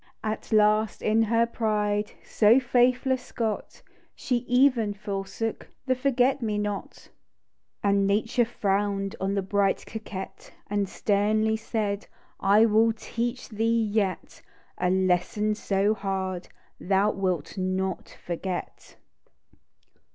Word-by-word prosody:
At 215 Hz, 0 st, -4 dB
last, 215 Hz, 0 st, +3 dB
in 220 Hz, +1 st, +3 dB
her 230 Hz, +1 st, +3 dB
pride, 210 Hz, -2 st, -1 dB
She -, -, -24 dB
so 220 Hz, +4 st, +5 dB
faithless 250 Hz, +1 st, +1 dB
got. 220 Hz, -3 st, -3 dB, 0.3 s
She 250 Hz, -, -1 dB
even 245 Hz, -5 st, +3 dB
forsook 200 Hz, +2 st, -4 dB, 0.2 s
The 260 Hz, -, +2 dB
forgot 255 Hz, 0 st, +1 dB
me 215 Hz, -3 st, -1 dB
not. 205 Hz, -1 st, -3 dB
THE -, -, -17 dB
DEW -, -, -18 dB
DROT -, -, -32 dB
75 200 Hz, -, +2 dB
And 200 Hz, 0 st, +2 dB
Nature 220 Hz, +4 st, +2 dB
frown'd 200 Hz, -3 st, -1 dB
On 195 Hz, +1 st, 0 dB
the 195 Hz, -, 0 dB
bright 195 Hz, 0 st, +1 dB
coquette, 210 Hz, -3 st, -8 dB, 0.2 s
And 205 Hz, -2 st, 0 dB
sternly 215 Hz, +2 st, +1 dB
said 215 Hz, -2 st, -3 dB
— -, -, -32 dB
" -, -, -48 dB
I 205 Hz, +3 st, +5 dB
null 225 Hz, +1 st, +4 dB
teach 235 Hz, +3 st, -4 dB
thee 225 Hz, +1 st, +1 dB
yet, 205 Hz, -3 st, -2 dB, 0.4 s
A 180 Hz, -, +1 dB
lesson 190 Hz, +3 st, +1 dB
so 205 Hz, 0 st, +1 dB
hard 190 Hz, -3 st, -3 dB, 0.3 s
Thou 195 Hz, +2 st, +2 dB
wilt 185 Hz, -5 st, -2 dB
not 185 Hz, 0 st, -2 dB, 0.2 s
forget 175 Hz, +1 st, -5 dB
210 Hz, 135 wpm, -26 LUFS, 195-225 Hz, 0.4 s, so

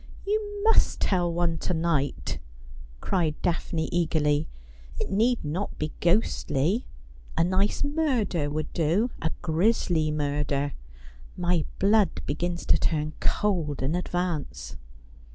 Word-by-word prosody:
' -, -, -18 dB
You 415 Hz, 0 st, -1 dB
must 450 Hz, +1 st, +4 dB
tell 175 Hz, -3 st, +1 dB
one 170 Hz, -1 st, 0 dB
to 180 Hz, -, -1 dB
night,' 160 Hz, -4 st, 0 dB, 0.6 s
cried 165 Hz, -5 st, 0 dB
Daphne 165 Hz, -1 st, 0 dB
eagerly. 155 Hz, -3 st, +1 dB, 0.3 s
' -, -, -16 dB
It -, -, -3 dB
need 225 Hz, +1 st, +2 dB
not 170 Hz, +7 st, -3 dB
be 155 Hz, 0 st, -2 dB
ghostly. 175 Hz, -, +1 dB, 0.5 s
A 165 Hz, -, +4 dB
nice 190 Hz, +7 st, +1 dB
murder 260 Hz, -, 0 dB
would 155 Hz, +1 st, -3 dB
do 175 Hz, +9 st, +1 dB
— -, -, -16 dB
a 160 Hz, -, +1 dB
grisly 165 Hz, -2 st, +2 dB
murder. 145 Hz, -1 st, -1 dB, 0.6 s
My 175 Hz, -3 st, +1 dB
blood 205 Hz, -1 st, +3 dB
begins 170 Hz, +4 st, -2 dB
to -, -, +4 dB
turn 155 Hz, -1 st, 0 dB
cold 170 Hz, -10 st, 0 dB
in 140 Hz, +4 st, 0 dB
advance.' 175 Hz, -3 st, -2 dB
170 Hz, 130 wpm, -27 LUFS, 150-195 Hz, 0.6 s, must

